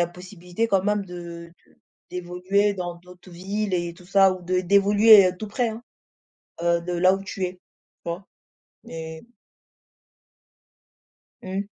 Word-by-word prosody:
a - - +1
possibilité 180 +3 -5
quand 195 -3 +2
même 210 -1 0
de 170 -1 -9 0.2
de - - -27 0.3
d'évoluer 180 +3 0
dans 175 -2 -4
d'autres 180 +1 -16
villes 195 +3 -4
et 175 -1 -2
tout 180 +1 -17
ça 195 0 +5
ou 185 - -11
d 185 +1 0
d'évoluer, 200 +1 +6
heu, 180 - -5
tout 215 - -5
près, 235 +3 -1
hein, 225 +2 -7 0.8
heu, 170 0 +2
de 175 +1 -5
là 185 +2 +4
où 195 - -5
tu 195 -1 -4
es. 180 - -3
Tu 180 - -27 0.4
vois? 170 +3 -5 0.6
Et 160 +2 -8 2.2
Mmh. 190 +2 -3
185 Hz, 155 wpm, -24 LUFS, 175-200 Hz, 2.2 s, d'évoluer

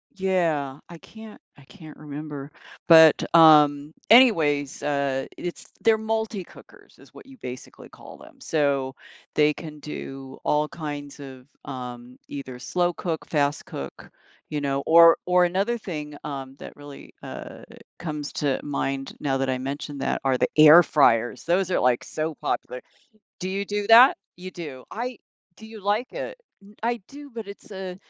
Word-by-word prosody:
Yeah, 165 -8 -1
I 170 - -10
can't 220 +3 -13 0.2
I 140 - -18
can't 155 +1 -14
remember. 150 -1 -8 0.4
But, 160 -2 +8
um, 150 -2 +6 0.2
anyways, 155 - +4
uh, 140 -2 -1
i - - -21
it's 175 - -6 0.2
they're 225 -1 +4
multi 220 -2 -2
cookers - - -18
is - - -19
what - - -14
you 270 -1 -15
basically 125 - -10
call - - -14
them. - - -17
So, 140 -4 -1 0.4
they 150 0 +3
can 150 -2 -10
do 135 -2 -8
all 150 0 +1
kinds 145 -3 -7
of, 130 -2 -11 0.2
um, 125 -1 -8
either 130 -3 -8
slow 175 +6 -1
cook, 165 -2 -4
fast 145 -2 0
cook, 70 -1 -9 0.4
you 150 -1 -3
know, 140 -1 -1
or 165 0 +7
or 180 0 +4
another 195 +7 0
thing, 150 -7 -6
um, 135 -2 -7
that - - -10
really, 145 -1 -13
uh, - - -9 0.4
comes 150 -3 -5
to 140 -3 -1
mind 135 -1 -3
now 135 -2 -1
that 135 0 -1
I 130 - 0
mentioned 140 +2 -6
that - - -1
are 130 -1 +2
the - - +1
air 155 +3 +9
fryers. 120 -6 +2
Those 180 +2 +1
are, - - +2
like, 125 -1 +2
so 155 0 -4
popular. 125 -2 -4 0.6
Do 185 - -3
you 195 +1 -2
do 205 0 -3
that? 235 +4 +8 0.2
You 185 +1 -9
do, 150 -8 -9
I 245 +1 -5 0.4
Do 220 - -13
you 220 -1 -11
like 210 +5 -1
it? - - -6 0.5
I 235 0 -1
do, 285 0 -12
but 225 -2 -7
it's 200 +1 -12
a 190 -2 -7
150 Hz, 165 wpm, -24 LUFS, 140-185 Hz, 0.6 s, air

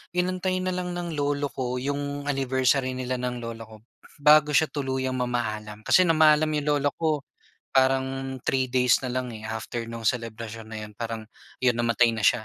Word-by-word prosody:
inantay 185 +1 0
na 185 - 0
lang 180 0 -3
ng 175 -1 -4
lolo 145 0 0
ko 125 -1 -2
'yong 145 +2 -3
anniversary 130 -1 +1
nila 130 0 -2
ng 125 0 -2
lola 115 -1 -6
ko 110 -1 -15 0.4
bago 150 0 +7
siya 160 - +5
tuluyang 130 -2 -1
mamaalam. 110 -4 -3
Kasi, 185 - +6
namaalam 155 -1 +5
'yong 150 -1 -1
lolo 145 -1 +2
ko, 160 -1 +1 0.7
parang 135 0 +1
3 130 -1 +2
days 125 -1 +4
na - - -1
lang, 130 -1 -2
eh, 110 - -9
after 115 +1 -4
no'ng 115 -1 -7
selebrasyon 115 -1 -4
na 110 - -7
'yon, 105 - -11
parang 115 -1 -4 0.4
'yon, 125 -1 +4
namatay 115 0 +3
na 110 - -4
siya. 110 - +3
130 Hz, 180 wpm, -26 LUFS, 115-145 Hz, 0.7 s, bago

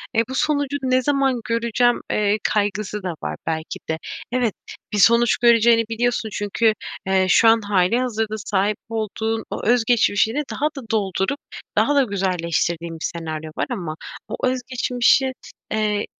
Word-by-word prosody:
eee, 225 - +4
bu 260 - -4
sonucu 285 -1 0
ne 255 0 +2
zaman 270 -2 +1
göreceğim, 235 +1 +1
eee, 210 0 +2
kaygısı 210 0 -1
da 180 -2 -2
var 75 0 -3
belki 160 0 -3
de. 160 - 0 0.3
Evet, 245 -4 +1 0.4
bir - - 0
sonuç 235 +4 +5
göreceğini 235 -1 +5
biliyorsun. 235 0 0
Çünkü, 215 +2 +1 0.3
eee, 190 -1 +3
şu 225 - +5
an 225 0 +5
hâlihazırda 215 +3 0
sahip 205 0 0
olduğun 225 0 -2
o - - -5
öz 240 +1 +4
geçmişini 230 +3 +2
daha 295 - -2
da 240 -5 -8
doldurup 200 +5 0 0.4
daha 290 - +3
da 280 - +5
güzelleştirdiğin 170 -4 -1
bir - - -3
senaryo 160 -2 -5
var - - 0
ama 175 -10 -4 0.3
o - - -4
öz 255 0 0
geçmişin, 255 +1 +2 0.4
eee, 210 -1 0
220 Hz, 150 wpm, -22 LUFS, 195-245 Hz, 0.4 s, sonuç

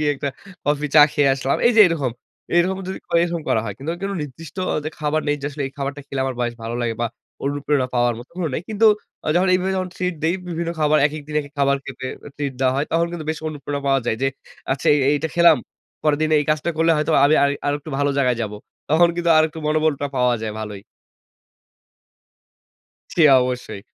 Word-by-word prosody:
গিয়ে 150 -1 +2
একটা 140 +1 -3 0.4
কফি, 150 0 0
চা 150 - +9
খেয়ে 145 -1 +3
আসলাম। 135 0 0
এইযে 235 -2 +5
এরকম 145 -7 -1 0.5
এরকম 185 +2 +2
যদি 190 - -4
করি 170 -1 +2
এরকম 170 -1 -3
করা 110 - +2
হয়। 105 -3 -5
কিন্তু 140 +4 -4
কোন 195 - -2
নির্দিষ্ট 150 +5 -10 0.3
যে - - -1
খাবার 155 +1 0
নেই 145 0 +1
যে 145 - -2
আসলে 145 0 -5
এই 135 - -9
খাবারটা 140 +1 -3
খেলে 135 -1 -4
আমার 130 -1 -2
বেশ 120 -1 -1
ভালো 115 +1 -4
লাগে 115 -1 -1
বা, 120 - +2 0.4
অনুপ্রেরণা 140 -1 0
পাওয়ার 120 0 +2
মতো 120 - -12
কোন 180 - -2
নাই। 155 - -2
কিন্তু, 220 +1 +3 0.5
যখন 185 +2 +3
এইভাবে 185 +1 0
যখন 185 -1 -2
ট্রিট 180 -1 -1
দেই 165 +3 +2
বিভিন্ন 170 0 -2
খাবার, 155 0 +4
একেক 150 0 -6
দিন 150 - -6
একেক 145 -1 -11
খাবার 140 0 +3
খেতে 130 -1 -7 0.2
এ - - -7
ট্রিট 145 -2 -2
দেওয়া 130 -1 +3
হয়। 145 +2 0
তখন 170 +1 +2
কিন্তু 160 -3 -5
বেশ 160 - -3
অনুপ্রেরণা 145 -1 -5
পাওয়া 135 0 +3
যায় 110 - +1
যে, 135 - +3 0.4
আচ্ছা, 135 - -4
এই - - +2
এইটা 150 +2 0
খেলাম। 170 -3 +7 0.5
পরের 150 -1 +2
দিনে 155 0 +2
এই 145 - -1
কাজটা 155 +2 0
করলে 165 +1 +3
হয়তো 150 - 0
আমি 150 +2 +5
আমি 140 - +2
আরেকটু 145 +2 -2
ভালো 145 0 +2
জায়গায় 125 -3 +2
যাবো। 105 -1 -4 0.3
তখন 170 +3 +5
কিন্তু 170 -1 +1
আরেকটু 155 0 +1
মনোবলটা 155 -2 +1
পাওয়া 125 -1 +3
যায় 110 -1 -3
ভালোই। 105 -2 -6 2.3
সে 170 - +3 0.2
অবশ্যই। 125 -5 -3
145 Hz, 210 wpm, -21 LUFS, 135-165 Hz, 2.3 s, চা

